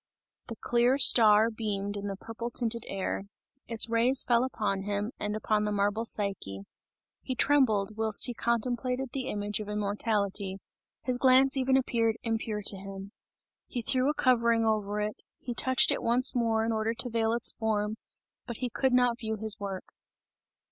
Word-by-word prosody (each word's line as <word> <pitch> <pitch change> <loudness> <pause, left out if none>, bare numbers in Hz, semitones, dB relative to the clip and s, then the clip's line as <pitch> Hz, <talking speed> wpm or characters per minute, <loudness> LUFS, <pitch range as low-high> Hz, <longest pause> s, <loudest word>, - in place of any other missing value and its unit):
The 230 - -5
clear 240 +4 +1
star 220 -4 +6
beamed 205 -2 -3
in 205 0 -5
the 195 - -4
purple 230 +4 -7
tinted 235 -1 -1
air, 195 +1 -4 0.4
its 230 -1 0
rays 235 +3 +3
fell 240 0 +3
upon 210 -6 -2
him, 205 +2 -3
and 210 0 -3
upon 215 -1 0
the 210 - -1
marble 205 +2 0
Psyche; 195 - -1 0.6
he 255 - -4
trembled 220 -8 +2
whilst 220 -2 +2
he 245 - -1
contemplated 245 +3 -2
the 265 -1 -3
image 205 -2 -3
of 210 -1 -7
immortality, 205 -1 -2 0.5
his 250 -1 -2
glance 265 +1 +4
even 265 0 +2
appeared 230 -3 0
impure 220 -2 -3
to 195 - +3
him. 195 +1 -9 0.6
He 240 - -5
threw 255 +3 +2
a 300 - -1
covering 235 -4 +2
over 210 -1 -1
it, 210 0 -4 0.2
he 245 - -6
touched 260 +1 +3
it - - -1
once 245 +3 +4
more 225 -2 0
in 230 - -1
order 220 +1 -1
to 245 - -3
veil 225 0 0
its 235 0 +3
form, 215 -1 -2 0.5
but 235 -3 -6
he 250 -2 -4
could 265 +1 0
not 245 -1 +2
view 220 -2 -3
his 220 0 0
work. 195 -2 -6
225 Hz, 170 wpm, -28 LUFS, 210-245 Hz, 0.6 s, star